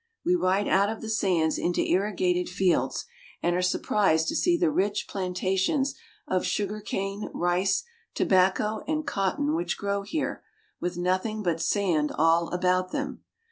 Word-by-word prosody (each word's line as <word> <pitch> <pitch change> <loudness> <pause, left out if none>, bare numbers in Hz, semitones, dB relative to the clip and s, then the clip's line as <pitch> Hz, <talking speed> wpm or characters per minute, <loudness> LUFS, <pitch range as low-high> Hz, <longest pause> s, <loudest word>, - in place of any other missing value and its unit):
We 355 - +3
ride 200 - +2
out 200 +2 +3
of 220 - -5
the 225 - -6
sands 180 -7 +1
into 175 - 0
irrigated 180 -2 +1
fields, 180 0 +1 0.4
and 175 0 +2
are 180 - +1
surprised 180 -3 +2
to - - -2
see 350 -1 +3
the 340 -3 +2
rich 205 -6 0
planta 185 0 -2
tions 270 +8 +1 0.3
of 185 -1 0
sugar 210 +1 -2
cane, 195 0 -3
rice, 180 +2 +1 0.3
tobacco, 190 +3 +2
and 310 0 -1
cotton 285 +10 0
which 340 +2 -1
grow 200 0 -1
here, 250 +10 -3 0.4
with 175 0 -3
nothing 185 +5 -1
but 165 -3 0
sand 170 -8 +1
all 165 +2 +3
about 185 0 +1
them. 280 -1 -4
190 Hz, 155 wpm, -27 LUFS, 180-215 Hz, 0.4 s, We